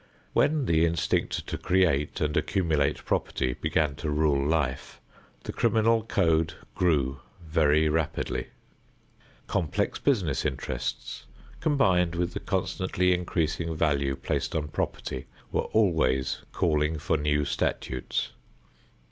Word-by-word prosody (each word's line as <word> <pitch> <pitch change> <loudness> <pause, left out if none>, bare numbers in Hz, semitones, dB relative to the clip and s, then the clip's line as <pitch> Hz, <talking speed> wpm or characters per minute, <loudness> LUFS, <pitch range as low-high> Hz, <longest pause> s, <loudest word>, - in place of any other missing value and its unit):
When 150 -2 +2
the 80 -5 +3
instinct 85 -1 0
to - - -4
create 85 -6 +1
and 75 0 0
accumulate 80 -7 +1
property 65 - 0
began 75 +3 0
to 80 - -3
rule 75 -2 +2
life, 70 -3 -1 0.4
the - - -5
criminal 115 0 +3
code 80 -7 +1 0.2
grew 70 -7 +1 0.3
very 80 -1 +3
rapidly. 80 0 -1 1.0
Complex 80 -5 -1
business - - +1
interests, 65 -1 -4 0.3
combined 95 - +2
with 85 0 -1
the - - -3
constantly 90 0 0
increasing 85 -2 -1
value 70 -3 +1
placed - - -2
on 75 -2 -1
property, 65 -2 -3 0.2
were - - 0
always 80 -11 +2
calling 75 -1 +1
for 80 +2 0
new 75 -1 +1
statutes. 65 -2 -2
80 Hz, 115 wpm, -27 LUFS, 75-90 Hz, 1.0 s, the